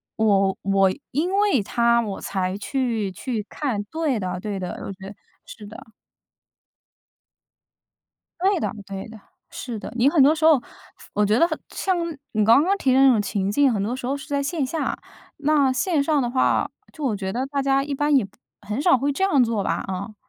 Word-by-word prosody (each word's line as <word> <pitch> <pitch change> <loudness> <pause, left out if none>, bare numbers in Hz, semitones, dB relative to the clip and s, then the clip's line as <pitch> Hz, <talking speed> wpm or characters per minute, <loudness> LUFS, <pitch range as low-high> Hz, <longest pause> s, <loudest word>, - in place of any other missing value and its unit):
我 195 -3 +2
我 195 -1 +3 0.2
因 320 +7 0
为 400 - +2
他 235 +3 +2
我 205 -4 -5
才 190 0 -2
去 230 -4 -2
去 220 +1 -4
看， 245 -9 -3
对 290 +2 -2
的 180 -2 -3
对 200 0 -4
的， 180 -1 -4 0.2
我 - - -5
觉 190 0 -10
得 200 - -10 0.3
是 210 -2 -11
的。 220 +1 -12 2.5
对 385 0 +2
的 - - -2 0.2
对 195 0 -6
的， 220 0 -12 0.3
是 240 -3 -6
的， - - -8
你 250 +3 +4
很 300 -1 +3
多 290 +3 +6
时 315 0 -5
候 315 -4 +6
发 - - -22 0.5
我 210 - +2
觉 210 +2 +2
得 335 - +4 0.2
像 380 -1 -1 0.4
你 215 -1 +1
刚 230 +7 +6
刚 385 +4 +2
提 270 -9 +1
的 260 - +4
那 270 - +7
种 225 -4 +2
情 200 -1 -2
境， 275 +4 +3
很 205 -4 -1
多 230 +5 -2
时 255 -1 -6
候 275 +2 -1
是 275 - -11
在 285 -2 -1
线 290 0 -1
下。 315 +5 -2 0.4
那 290 -2 +2
线 290 +3 +1
上 300 0 +2
的 245 - 0
话， 255 +1 +1 0.2
就 310 - -9
我 245 -6 0
觉 190 -1 -4
得 250 +5 -2
大 280 0 -2
家 275 0 +2
一 285 0 -4
般 290 +1 +2
也 245 -8 +2 0.3
很 215 +6 -3
少 350 -3 +5
会 280 +3 0
这 330 +7 -2
样 290 -10 +4
做 225 -4 -1
吧， - - -1
啊。 195 +3 -5
245 Hz, 220 characters per minute, -23 LUFS, 205-285 Hz, 2.5 s, 那